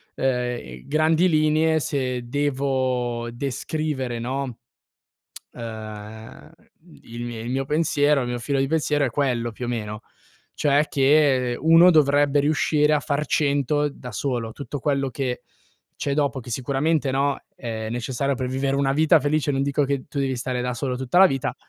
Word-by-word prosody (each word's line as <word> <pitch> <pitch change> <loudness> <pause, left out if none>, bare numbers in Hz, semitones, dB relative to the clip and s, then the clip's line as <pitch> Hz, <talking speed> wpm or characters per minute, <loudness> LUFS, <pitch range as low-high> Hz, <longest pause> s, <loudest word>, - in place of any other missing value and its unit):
uhm, 125 - -2
grandi 160 +4 +3
linee 155 0 +3
se 125 -4 -2
devo 130 -4 -1
descrivere, 135 0 -3
no, 130 0 -4 1.0
uhm, 110 -1 -9 0.5
il 120 +1 -7
mie 120 -2 -6
il 120 +2 -5
mio 135 +1 -1
pensiero 150 -1 +2
il 120 - -3
mio 120 0 -2
filo 135 +3 -1
di 135 - +2
pensiero 150 -1 +1
è - - -3
quello 120 -3 0
più 125 - -7
o - - -4
meno. 105 -3 -4 0.5
Cioè 145 +1 +2
che 135 -3 +3
uno 165 +3 +6
dovrebbe 145 -2 +4
riuscire 150 0 +2
a 150 - +3
far 145 +1 -1
100 145 0 +1
da 125 -4 -10
solo. 115 -1 -2
Tutto 140 +2 -6
quello 140 -2 0
che 125 -1 -3 0.6
c'è 140 0 0
dopo, 140 -2 0
che 120 - -11
sicuramente, 140 +4 0
no, 140 +1 +1 0.2
è 110 -3 -5
necessario 130 +3 -1
per 125 0 -3
vivere 135 +1 -1
una 135 -1 +1
vita 155 +2 +4
felice, 145 0 0
non 135 0 0
dico 140 +1 +1
che 140 -1 -2
tu 140 - -5
devi 135 -1 0
stare 125 0 -3
da 125 0 -2
solo 125 0 -2
tutta 130 +7 0
la 190 - +9
vita, 135 -4 -2
135 Hz, 165 wpm, -23 LUFS, 125-145 Hz, 1.0 s, la